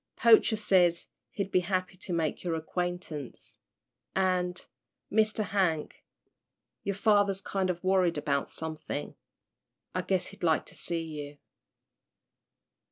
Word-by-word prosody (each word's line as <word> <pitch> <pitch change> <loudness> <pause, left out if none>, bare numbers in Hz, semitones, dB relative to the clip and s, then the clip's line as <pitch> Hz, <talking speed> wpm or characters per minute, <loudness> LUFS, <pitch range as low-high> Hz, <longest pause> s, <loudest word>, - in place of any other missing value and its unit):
Poacher 230 -1 +6
says 180 -5 +3 0.2
he'd 200 -1 -4
be 185 - +4
happy 185 +1 -1
to 185 +1 -8
make 165 -3 -1
your 170 -2 -1
acquaintance 160 -4 -3 0.6
and, 180 -1 +1 0.5
Mr. 215 0 +2
Hank, 185 -6 -1 0.8
your 200 - -1
father's 205 -2 +3
kind 195 -1 -1
of 175 0 -2
worried 185 -3 +3
about 140 -1 0
somethin'. 155 -2 -2 0.8
I 185 - 0
guess 185 0 0
he'd 200 +1 -14
like 160 -2 +2
to - - -7
see 170 -1 -1
you." 150 -2 -7
180 Hz, 120 wpm, -29 LUFS, 165-195 Hz, 0.8 s, Poacher